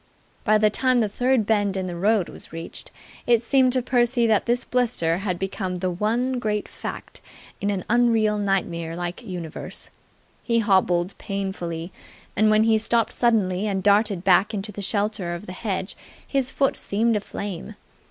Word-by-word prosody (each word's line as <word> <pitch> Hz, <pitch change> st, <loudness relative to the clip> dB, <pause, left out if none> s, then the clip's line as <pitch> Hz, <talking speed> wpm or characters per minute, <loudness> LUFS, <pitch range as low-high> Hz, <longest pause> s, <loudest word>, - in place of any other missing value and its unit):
By 215 Hz, 0 st, +4 dB
the 215 Hz, 0 st, +3 dB
time 255 Hz, +2 st, +2 dB
the 220 Hz, -, +2 dB
third 245 Hz, +2 st, +1 dB
bend 205 Hz, -2 st, +1 dB
in 190 Hz, -, -2 dB
the 175 Hz, -1 st, -5 dB
road 200 Hz, +1 st, +2 dB
was -, -, -8 dB
reached, 165 Hz, 0 st, -8 dB, 0.4 s
it 240 Hz, -1 st, +4 dB
seemed 260 Hz, +1 st, +3 dB
to 255 Hz, -1 st, +1 dB
Percy 240 Hz, -1 st, +2 dB
that 220 Hz, -1 st, +2 dB
this 245 Hz, +1 st, +1 dB
blister 230 Hz, -10 st, +1 dB
had 190 Hz, -3 st, -2 dB
become 190 Hz, 0 st, -3 dB
the 180 Hz, 0 st, -2 dB
one 235 Hz, +7 st, 0 dB
great 210 Hz, -3 st, -2 dB
Fact -, -, -8 dB, 0.4 s
in 200 Hz, -, 0 dB
an 195 Hz, -3 st, -2 dB
unreal 225 Hz, -3 st, +3 dB
nightmare 170 Hz, -5 st, -1 dB
like 175 Hz, +4 st, -4 dB
universe. 175 Hz, -7 st, -7 dB, 0.5 s
He 230 Hz, -1 st, 0 dB
hobbled 190 Hz, -4 st, +2 dB
painfully: 190 Hz, -4 st, -4 dB, 0.4 s
and 215 Hz, +1 st, +4 dB
when 215 Hz, 0 st, +4 dB
he 220 Hz, -1 st, +3 dB
stopped 230 Hz, +1 st, +1 dB
suddenly 210 Hz, -5 st, +1 dB
and 190 Hz, -2 st, -1 dB
darted 205 Hz, -2 st, +3 dB
back 195 Hz, +3 st, +4 dB
into 205 Hz, +1 st, -3 dB
the 205 Hz, -, -7 dB
shelter 200 Hz, -3 st, -1 dB
of 175 Hz, -, -8 dB
the 180 Hz, -, -7 dB
hedge 190 Hz, -1 st, -3 dB, 0.3 s
his 270 Hz, -2 st, 0 dB
foot 275 Hz, -1 st, +1 dB
seemed 225 Hz, +3 st, +1 dB
aflame. 205 Hz, -1 st, -5 dB
210 Hz, 170 wpm, -24 LUFS, 185-230 Hz, 0.5 s, By